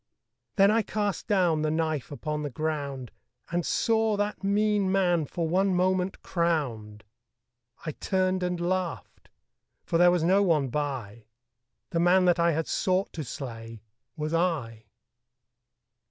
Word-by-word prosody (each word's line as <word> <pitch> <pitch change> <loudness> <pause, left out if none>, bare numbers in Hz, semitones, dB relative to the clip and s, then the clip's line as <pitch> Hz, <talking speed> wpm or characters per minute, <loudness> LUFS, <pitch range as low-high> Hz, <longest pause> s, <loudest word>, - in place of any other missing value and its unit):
Then 200 0 +5
I 225 +1 +3
cast 205 -1 -3
down 180 -7 +2
the 155 - 0
knife 155 -3 -1
upon 150 +1 -4
the 145 - -3
ground 140 -3 -4 0.4
And 175 0 0
saw 220 +1 +1
that 205 0 -2
mean 205 -1 +2
man 175 -4 +2
for 165 +3 -2
one 190 +3 +2
moment 185 +1 0
crowned. 125 - -2 0.8
I 155 - -2
turned 185 +3 0
and 180 -1 -1
laughed: 180 0 -3 0.5
for 165 - 0
there 175 0 +7
was 175 -2 +2
no 190 +4 +4
one 155 -8 +2
by 120 -6 -4 0.7
The 165 - 0
man 180 +2 +4
that 175 -1 +3
I 170 0 +4
had 160 +1 -1
sought 185 +1 0
to 160 - -4
slay 115 -4 -8 0.3
was 155 +1 -3
I. 145 -11 -1
170 Hz, 140 wpm, -27 LUFS, 150-185 Hz, 0.8 s, there